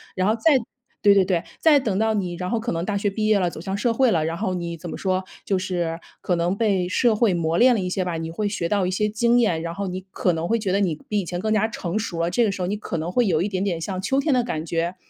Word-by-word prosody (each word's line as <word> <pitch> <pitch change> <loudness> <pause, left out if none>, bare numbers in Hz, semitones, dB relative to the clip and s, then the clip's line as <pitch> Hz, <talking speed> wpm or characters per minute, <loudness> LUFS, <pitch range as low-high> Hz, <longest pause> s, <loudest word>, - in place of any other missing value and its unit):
然 185 +1 +1
后 220 - +3
再 265 +4 +4 0.4
对 205 -1 +6
对 195 -1 +5
对， 180 -2 0 0.2
再 305 -3 +5
等 215 -7 -1
到 220 0 +2
你 180 -4 -2
然 180 +1 -4
后 230 - 0
可 235 +2 -3
能 165 0 -2
大 200 +1 -1
学 200 0 0
毕 215 +1 -1
业 215 -1 +4
了， 180 -3 0
走 160 - -8
向 195 +2 -3
社 235 +1 +1
会 260 +1 +3
了， 160 -6 +1
然 165 +1 -2
后 185 +1 -1
你 170 -1 -4
怎 170 +1 -8
么 - - -5
说， 185 -1 0 0.2
就 195 -2 +1
是 175 -3 -2 0.2
可 180 - 0
能 175 +3 0
被 195 -5 +1
社 225 +2 +3
会 215 -2 +3
磨 165 0 0
炼 250 0 +6
了 - - 0
一 185 - -2
些 185 0 -1
吧， 175 -2 -3
你 165 0 -4
会 205 +4 -2
学 175 -5 -2
到 195 -2 +1
一 - - -1
些 210 +3 +1
经 235 +3 +2
验， 175 -9 +2
然 170 0 -5
后 200 - -3
你 185 +1 -4
可 180 -2 0
能 165 +1 -2
会 230 - +2
觉 205 -4 -2
得 195 - +2
你 180 -6 +1
比 210 - 0
以 - - -1
前 175 +1 -4
更 215 +2 0
加 215 +1 +2
成 195 -2 -3
熟 180 -6 -4
了， 170 +1 0
这 235 +6 +2
个 210 - +2
时 195 - -6
候 180 - -1
你 205 - -1
可 205 -5 -4
能 165 +3 -3
会 240 +1 +2
有 160 -4 +2
一 - - 0
点 190 -2 -2
点 180 -5 -1
像 185 +2 -4
秋 270 +7 +1
天 280 0 +1
的 250 -1 +3
感 160 -9 -3
觉。 170 +2 -2
190 Hz, 340 characters per minute, -23 LUFS, 175-215 Hz, 0.4 s, 对